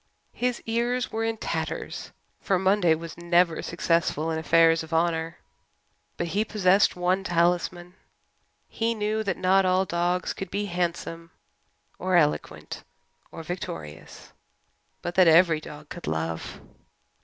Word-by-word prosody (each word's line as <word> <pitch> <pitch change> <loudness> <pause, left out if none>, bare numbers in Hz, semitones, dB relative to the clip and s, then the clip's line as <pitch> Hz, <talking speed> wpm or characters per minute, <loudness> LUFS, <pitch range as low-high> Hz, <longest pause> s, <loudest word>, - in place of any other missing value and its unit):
His 250 0 -2
ears 240 +2 -1
were 225 +1 -2
in 225 0 -1
tatters, - - -4 0.3
for 195 - +1
Monday 190 -3 +3
was 165 +1 -9
never 175 -1 +2
successful 165 -2 0
in 160 - -1
affairs 165 0 +4
of 160 0 -4
honour. 165 0 0 0.8
But 170 - -2
he 205 +5 +1
possessed 200 -2 +3
one 180 +2 0
talisman. 175 0 0 0.7
He 230 +1 -1
knew 215 0 -1
that 195 -3 -2
not 190 +1 +3
all 185 +1 +2
dogs 175 +1 -1
could 195 - -6
be 205 +1 -2
handsome 170 -2 -3 0.7
or 185 0 0
eloquent 150 -4 0 0.5
or 165 - -8
victorious, 80 - -8 0.7
but 175 - -3
that 185 -1 +5
every 165 -1 +5
dog 150 0 -11
could 175 - -8
love. 80 +1 -3
175 Hz, 130 wpm, -26 LUFS, 165-195 Hz, 0.8 s, that